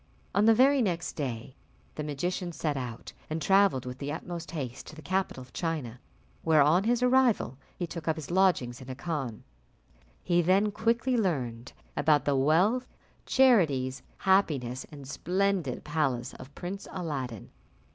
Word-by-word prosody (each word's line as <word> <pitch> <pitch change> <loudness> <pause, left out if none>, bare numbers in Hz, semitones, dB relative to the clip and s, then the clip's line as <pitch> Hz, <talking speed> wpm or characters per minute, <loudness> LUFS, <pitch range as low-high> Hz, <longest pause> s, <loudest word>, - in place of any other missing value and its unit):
On 205 +1 +3
the 225 0 +6
very 270 +3 +5
next 175 -6 -1
day, 130 -3 -5 0.4
the 150 - -4
magician 175 +5 -3
set 155 -3 -2
out 125 -4 -6 0.2
and 155 +1 -2
travelled 195 -8 +3
with 125 +1 -7
the 140 0 -3
utmost 170 +1 -6
haste 130 -7 -5
to 155 - -10
the 155 - -10
capital 185 -4 -1
of 125 0 -14
China, 150 -9 -3 0.4
where, 155 -3 +5
on 170 +7 +3
his 240 +1 +2
arrival, 250 - +3 0.2
he 175 - -2
took 170 -1 -8
up 160 - +2
his 160 -1 -7
lodgings 175 -10 +2
in 130 - -10
a 130 - -5
khan. 140 -7 -4 0.8
He 175 -1 +3
then 195 +5 +3
quickly 235 +4 +1
learnt 130 - -1 0.2
about 145 -2 +3
the 145 - +2
wealth, 180 - +3 0.4
charities, 155 - +3 0.2
happiness, 140 -10 +1
and 140 -3 -10
splendid 185 -3 -1
palace 135 -5 -1
of 130 +2 -12
Prince 190 +2 -6
Aladdin. 135 - -5
160 Hz, 155 wpm, -29 LUFS, 130-190 Hz, 0.8 s, the